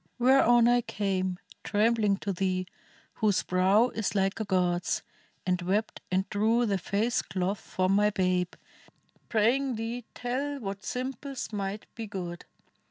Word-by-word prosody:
Whereon 240 -2 +5
I 245 0 +4
came 190 -4 -1 0.3
Trembling 210 -1 +2
to 200 - -2
thee, 185 0 -1 0.5
whose 210 -4 +1
brow 190 +6 +3
is 220 -3 -2
like 195 +1 +1
a 220 - -1
god's, 180 -2 +1 0.4
And 180 0 +1
wept 200 +5 -1
and 190 +1 +1
drew 225 +4 +2
the 200 -3 0
face 210 +7 0
cloth 185 +2 -2
from 185 0 -1
my 210 +1 +4
babe, 185 -3 0 0.7
Praying 245 +4 +2
thee 225 +2 -4
tell 275 +4 -2
what 195 -3 -5
simples 265 0 -4
might 200 0 -3
be 225 -1 -6
good. 180 -3 -6
205 Hz, 140 wpm, -29 LUFS, 185-235 Hz, 0.7 s, Whereon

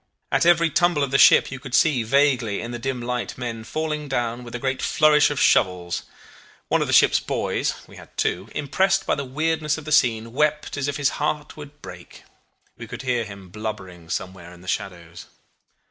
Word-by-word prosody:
At - - +2
every 170 -1 +4
tumble 175 -2 +2
of 135 - -2
the 135 - +3
ship - - +6
you 135 - -6
could 130 0 -4
see 155 -7 +3
vaguely 125 -3 +2
in 115 - -6
the 120 - -5
dim 125 -1 -3
light 125 0 -3
men 115 -3 -5
falling 150 +3 -3
down 120 -2 -2
with 120 0 -9
a - - -1
great 130 +1 -2
flourish 150 -1 +4
of 145 -2 -3
shovels. 90 -2 +2 0.7
One - - +2
of - - 0
the - - -2
ship's - - +5
boys - - -2
(we - - -15
had - - -15
two), 95 +5 -1
impressed 190 +7 +1
by - - +1
the 140 - -2
weirdness 155 +3 -1
of 160 - -9
the 155 - -6
scene, 115 -6 +2
wept 150 +2 0
as 140 -1 -2
if 145 - -2
his 145 -1 +2
heart 150 0 -2
would 145 -1 -12
break. 90 -1 -11 0.5
We - - -9
could - - -8
hear 120 -3 0
him 100 -3 -11
blubbering 95 -5 -7
somewhere 90 -1 -5
in 90 - -15
the 90 - -15
shadows. 85 -3 -5
130 Hz, 205 wpm, -23 LUFS, 110-150 Hz, 0.7 s, ship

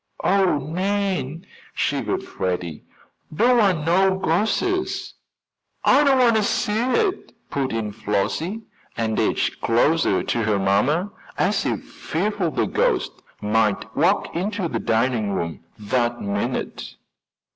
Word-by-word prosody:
"Oh, 190 -5 +3
Nan!" 180 0 -2 0.3
shivered - - -1
Freddie. 90 -4 -4 0.5
"Don't 240 +9 +3
want 185 -8 +2
no 190 +3 +3
ghostses!" 220 - 0 0.7
"I 285 +3 +6
don't 275 -2 +4
want 235 -3 +4
to - - +3
see 210 - 0
it," 365 - 0 0.2
put 135 -2 -1
in 110 -2 -2
Flossie, 155 - -2 0.3
and 110 -2 0
edged - - 0
closer 145 +8 +2
to 120 - -1
her 105 -1 +1
mamma 125 - +1 0.3
as - - +1
if - - -2
fearful 185 +1 -2
the - - 0
ghost - - +1 0.3
might 110 +1 0
walk 175 +6 +1
into 195 +1 -1
the - - -3
dining 115 -2 0
room 85 -3 -4
that 120 +2 -1
minute. 100 0 -3
160 Hz, 125 wpm, -22 LUFS, -, 0.7 s, I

